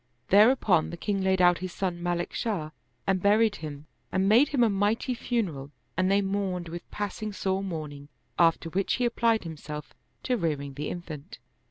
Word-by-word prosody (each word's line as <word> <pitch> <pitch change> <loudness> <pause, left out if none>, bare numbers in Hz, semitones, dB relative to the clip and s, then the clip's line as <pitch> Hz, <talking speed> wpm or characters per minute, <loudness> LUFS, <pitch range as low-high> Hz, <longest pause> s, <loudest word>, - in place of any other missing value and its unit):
Thereupon 210 -4 +5
the 170 - -7
king 200 +2 -1
laid 190 -1 +2
out 175 -1 +5
his 185 0 -5
son 180 -2 -3
Malik 175 0 -2
Shah 180 -9 -2 0.3
and 190 -1 +1
buried 210 +1 +4
him 150 -1 -7 0.3
and 190 +1 +1
made 235 +8 +6
him 270 -4 +2
a - - +5
mighty 205 +5 +1
funeral 195 - -2 0.3
and 185 +1 +2
they 200 +1 +3
mourned 190 -3 -2
with 175 +1 -8
passing 210 +1 -4
sore 190 -1 -1
mourning; 150 -6 -6 0.3
after 165 0 +4
which 195 +3 +1
he 250 - 0
applied 230 -1 +2
himself 150 -2 -7 0.3
to 250 - +1
rearing 145 -6 -2
the 145 +2 -4
infant. 170 +2 -7
190 Hz, 175 wpm, -27 LUFS, 165-205 Hz, 0.3 s, made